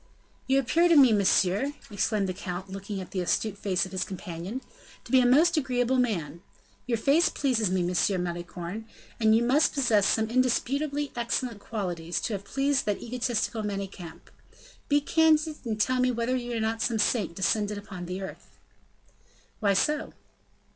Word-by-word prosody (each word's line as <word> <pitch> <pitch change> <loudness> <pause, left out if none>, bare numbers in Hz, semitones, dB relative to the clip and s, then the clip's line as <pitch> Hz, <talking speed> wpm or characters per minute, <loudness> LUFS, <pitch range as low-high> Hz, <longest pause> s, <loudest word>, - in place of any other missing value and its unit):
"You 265 0 +3
appear 325 +7 +3
to 335 - +5
me, 265 -6 +7
monsieur!" 200 +5 +2 0.2
exclaimed 205 0 0
the 185 - -2
count, 185 0 -6
looking 195 +1 -5
at 185 - -8
the 190 - -2
astute 200 +3 0
face 195 -2 0
of 185 - -10
his 185 -1 -1
companion, 185 +5 -6 0.4
"to - - -12
be 260 - +6
a 250 - +4
most 320 +7 +4
agreeable 255 -2 +1
man. 170 - -1 0.5
Your 235 -2 +1
face 285 +9 +3
pleases 240 -8 0
me, 185 0 +1
M. 180 +1 +1
Malicorne, 175 +4 -6 0.3
and 220 -1 +4
you 230 - +3
must 275 +6 +3
possess 230 -8 +3
some 220 0 +2
indisputably 275 +4 0
excellent 235 -1 -2
qualities 175 -6 -3
to 230 - -2
have 200 0 -5
pleased 275 -1 0
that 205 - 0
egotistical 240 -2 -2
Manicamp. 195 -5 -6 0.6
Be 290 0 +3
candid 315 0 +3
and 220 -2 -3
tell 255 +4 +2
me 250 0 +3
whether 240 +1 0
you 240 -2 -3
are - - -1
not 225 +1 -1
some 230 -1 0
saint 205 -4 +1
descended 205 +2 0
upon 190 -4 -8
the 185 +2 -4
earth." 190 - -10 1.0
"Why 200 -2 +2
so?" 300 +10 0
220 Hz, 170 wpm, -27 LUFS, 190-255 Hz, 1.0 s, me